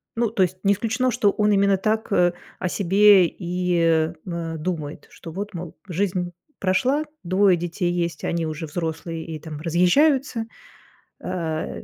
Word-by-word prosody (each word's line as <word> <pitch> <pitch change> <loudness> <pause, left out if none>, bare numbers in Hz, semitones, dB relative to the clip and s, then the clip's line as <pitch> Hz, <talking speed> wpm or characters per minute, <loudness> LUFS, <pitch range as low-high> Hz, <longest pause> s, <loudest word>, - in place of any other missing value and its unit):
Ну, 230 -2 +1
то 200 -4 +2
есть, 185 +1 -1
не 200 0 +4
исключено, 225 +5 0
что 210 -4 +2
он 210 0 +1
именно 200 -1 +3
так, 220 +2 -1
э, 175 -2 +3 0.3
о 180 - -1
себе 195 0 +5
и, 180 0 -2
э 165 0 +2
э 165 -2 -4
думает, 155 -3 -4
что: 165 - -10
вот, 205 +4 -5
мол, 170 -1 -7
жизнь 180 -1 -1 0.3
прошла, 255 +11 +1 0.2
2 185 +1 +3
детей 175 +1 -2
есть, 170 -3 -2
и - - -1
они 170 -1 -1
уже 155 0 -4
взрослые 165 0 -4
и, 160 -2 -6
там, 155 -1 -8
разъезжаются. 225 - +2 0.8
Э, 160 - -3
180 Hz, 160 wpm, -23 LUFS, 165-205 Hz, 0.8 s, себе